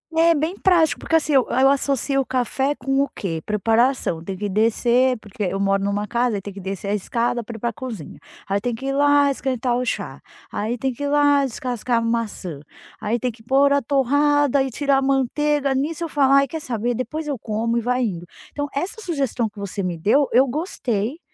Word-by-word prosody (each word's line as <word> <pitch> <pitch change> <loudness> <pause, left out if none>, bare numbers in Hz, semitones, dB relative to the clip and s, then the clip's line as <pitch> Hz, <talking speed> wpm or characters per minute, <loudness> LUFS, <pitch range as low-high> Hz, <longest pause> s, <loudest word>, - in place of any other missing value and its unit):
É, 335 +1 +5
bem 315 +5 -1
prático, 340 -5 +3
porque, 325 - +2
assim, 305 -1 0
eu 265 -2 +5
eu 265 +2 +4
associo 275 0 +1
o - - -4
café 260 +2 0
com 270 +2 0
o 280 - -4
que? 165 -5 -4
Preparação. 225 - +1
Tem 190 +1 -5
que 205 +1 -3
descer 235 +4 +2
porque 210 0 -7
eu 195 +1 -1
moro 195 0 +1
numa 205 +1 -1
casa, 240 -2 0
aí - - -5
tem 200 0 -8
que 195 - -9
descer 195 +1 -5
a - - +1
escada 235 +3 -1
pra 225 +1 -8
ir - - -12
pra 235 0 -2
cozinha, 220 - -7 0.3
aí 200 +1 0
tem 245 0 -2
que 265 +4 -7
ir - - 0
lá 285 0 +4
esquentar 255 -3 -1
o 250 - -1
chá, - - -4 0.3
aí 225 +4 -2
tem 265 +1 -1
que 285 - -7
ir - - 0
lá 290 -1 +4
descascar 245 -1 -2
uma 230 0 +1
maçã, 180 -8 -6 0.4
aí 230 +3 -1
tem 250 +1 -1
que 220 0 -19
por 275 +3 +3
a 280 - +3
torrada 285 +1 +2
e 265 - -3
tirar 275 +2 +1
a - - -2
manteiga, 275 +1 +1
nisso 310 +5 -2
eu - - -6
falo: 275 -2 +3
"Ai, 275 0 +5
quer 320 -2 -6
saber? 240 -1 -2
Depois 305 +5 -4
eu 280 -3 -2
como", 225 +2 -2
e - - +1
vai 250 +2 0
indo. 175 -6 -3 0.3
Então 290 0 -3
essa 365 +10 -3
sugestão 270 - -1
que 205 - -14
você 200 0 -4
me 175 -2 -2
deu, 265 - +2
eu 260 +3 +5
gostei, 255 - -2
250 Hz, 220 wpm, -22 LUFS, 220-280 Hz, 0.4 s, É